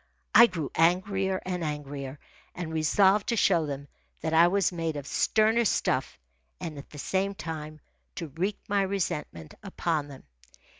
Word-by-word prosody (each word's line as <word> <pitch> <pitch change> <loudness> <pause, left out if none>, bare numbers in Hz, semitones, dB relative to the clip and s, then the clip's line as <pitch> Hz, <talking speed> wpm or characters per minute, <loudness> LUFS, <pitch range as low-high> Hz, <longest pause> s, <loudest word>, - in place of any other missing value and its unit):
I 235 - +9
grew 165 -8 -4
angrier 190 +3 +1
and 180 -2 -2
angrier, 145 -2 -5 0.4
and 165 -2 -5
resolved 190 +6 +3
to 235 - +2
show 170 -7 +3
them 140 0 -5 0.3
that 160 0 -2
I 165 +2 +7
was 195 0 +2
made 165 -3 -3
of 145 -2 -5
sterner 220 +8 +2
stuff 215 - 0 0.4
and 155 -4 -6
at 140 - -12
the 150 - -12
same 195 +6 -1
time 155 -3 -6 0.4
to 165 -3 -5
wreak 185 +8 -2
my 200 0 +2
resentment 170 - -3
upon 170 -7 -2
them. 140 -2 -12
165 Hz, 155 wpm, -28 LUFS, 150-195 Hz, 0.4 s, I